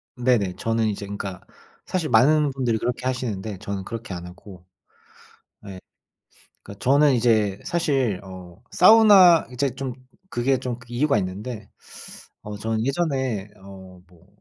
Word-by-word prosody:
네네. 120 Hz, -7 st, +1 dB
저는 115 Hz, -1 st, 0 dB
이제 100 Hz, 0 st, -5 dB
그러니까 100 Hz, -2 st, -6 dB, 0.4 s
사실 170 Hz, -5 st, -2 dB
많은 145 Hz, +5 st, +4 dB
분들이 125 Hz, -4 st, -1 dB
그렇게 120 Hz, +2 st, -3 dB
하시는데 110 Hz, -6 st, -4 dB
저는 100 Hz, -3 st, -5 dB
그렇게 115 Hz, -1 st, -7 dB
안 90 Hz, 0 st, -7 dB
하고. 90 Hz, 0 st, -14 dB, 1.0 s
네. 95 Hz, -2 st, -9 dB, 0.8 s
그러니까 100 Hz, 0 st, -12 dB
저는 140 Hz, +2 st, +4 dB
이제 110 Hz, -5 st, +1 dB
사실 135 Hz, -, 0 dB
어 90 Hz, -1 st, -12 dB
사우나 190 Hz, -4 st, +7 dB
이제 135 Hz, +2 st, -1 dB
좀 135 Hz, -2 st, -4 dB, 0.4 s
그게 130 Hz, 0 st, 0 dB
좀 125 Hz, -2 st, -4 dB
이유가 125 Hz, +3 st, +1 dB
있는데 105 Hz, +4 st, -6 dB, 0.7 s
어 105 Hz, 0 st, -7 dB
저는 110 Hz, +1 st, -2 dB
예전에 130 Hz, -, -2 dB, 0.2 s
어 95 Hz, -1 st, -12 dB, 0.2 s
뭐 85 Hz, -2 st, -23 dB
115 Hz, 280 characters per minute, -23 LUFS, 100-135 Hz, 1.0 s, 사우나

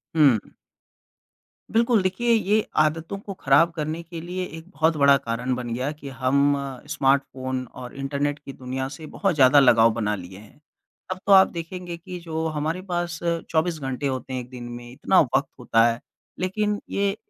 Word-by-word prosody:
हुँ, 150 Hz, -3 st, +7 dB
हुँ। 110 Hz, -5 st, -2 dB, 1.2 s
बिल्कुल, 230 Hz, -1 st, +3 dB
देखिए 190 Hz, +6 st, 0 dB
ये 215 Hz, -1 st, +2 dB
आदतों 160 Hz, +4 st, +1 dB
को 200 Hz, 0 st, -7 dB
ख़राब 165 Hz, 0 st, +3 dB
करने 155 Hz, 0 st, -3 dB
के 170 Hz, 0 st, -8 dB
लिए 180 Hz, +2 st, -4 dB
एक 160 Hz, 0 st, -10 dB
बहुत 160 Hz, -3 st, +1 dB
बड़ा 140 Hz, -1 st, +6 dB
कारण 125 Hz, -1 st, -2 dB
बन 120 Hz, -2 st, -4 dB
गया 130 Hz, +4 st, -2 dB
कि 150 Hz, -2 st, -9 dB
हम 135 Hz, +2 st, +2 dB, 0.3 s
स्मार्टफोन 130 Hz, -1 st, 0 dB
और 125 Hz, -1 st, -9 dB
इंटरनेट 140 Hz, +1 st, -2 dB
की 140 Hz, -2 st, -10 dB
दुनिया 130 Hz, +1 st, -4 dB
से 155 Hz, -, -10 dB
बहुत 195 Hz, 0 st, -1 dB
ज़्यादा 140 Hz, 0 st, +6 dB
लगाव 115 Hz, -4 st, +6 dB
बना 105 Hz, -2 st, -1 dB
लिए 95 Hz, -1 st, -10 dB
हैं। 105 Hz, +6 st, -17 dB, 0.5 s
अब 185 Hz, -, -3 dB
तो -, -, +3 dB
आप 190 Hz, 0 st, +8 dB
देखेंगे 175 Hz, +1 st, -6 dB
कि 180 Hz, +1 st, -8 dB
जो 160 Hz, -1 st, -4 dB
हमारे 155 Hz, +3 st, -2 dB
पास 175 Hz, -2 st, -2 dB, 0.3 s
24 160 Hz, 0 st, 0 dB
घंटे 135 Hz, 0 st, -3 dB
होते 130 Hz, -1 st, -4 dB
हैं 130 Hz, -, -1 dB
1 120 Hz, -, -12 dB
दिन 125 Hz, -1 st, -9 dB
में, 120 Hz, 0 st, -9 dB
इतना 180 Hz, +8 st, +3 dB, 0.2 s
वक़्त 140 Hz, +1 st, +2 dB
होता 115 Hz, -2 st, +3 dB
है, 115 Hz, 0 st, -1 dB, 0.4 s
लेकिन 205 Hz, +3 st, -1 dB
ये 200 Hz, 0 st, 0 dB
150 Hz, 180 wpm, -24 LUFS, 130-175 Hz, 1.2 s, आप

